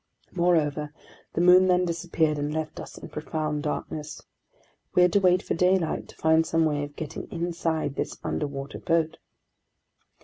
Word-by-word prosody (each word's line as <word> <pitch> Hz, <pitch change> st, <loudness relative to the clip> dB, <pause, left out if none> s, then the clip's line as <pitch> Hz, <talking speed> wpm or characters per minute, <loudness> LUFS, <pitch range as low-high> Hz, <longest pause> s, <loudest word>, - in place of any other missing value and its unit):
Moreover, 155 Hz, -4 st, +1 dB, 0.4 s
the -, -, 0 dB
moon 180 Hz, +1 st, +7 dB
then 180 Hz, 0 st, +3 dB
disappeared 165 Hz, -3 st, 0 dB
and 145 Hz, +1 st, -2 dB
left 155 Hz, 0 st, -4 dB
us -, -, -9 dB
in -, -, -9 dB
profound 150 Hz, -1 st, -3 dB
darkness. 150 Hz, 0 st, -4 dB, 0.8 s
We 180 Hz, -, +6 dB
had 180 Hz, -, +3 dB
to 200 Hz, -, +5 dB
wait 185 Hz, -1 st, +3 dB
for -, -, -2 dB
daylight 180 Hz, -1 st, +1 dB
to -, -, -15 dB
find 160 Hz, 0 st, +3 dB
some 165 Hz, 0 st, +1 dB
way 145 Hz, -2 st, 0 dB
of 145 Hz, 0 st, -8 dB
getting 155 Hz, -3 st, -6 dB
inside 165 Hz, -3 st, -1 dB
this -, -, -4 dB
underwater 140 Hz, -1 st, -4 dB
boat. 165 Hz, -1 st, 0 dB
160 Hz, 160 wpm, -26 LUFS, 150-175 Hz, 0.8 s, moon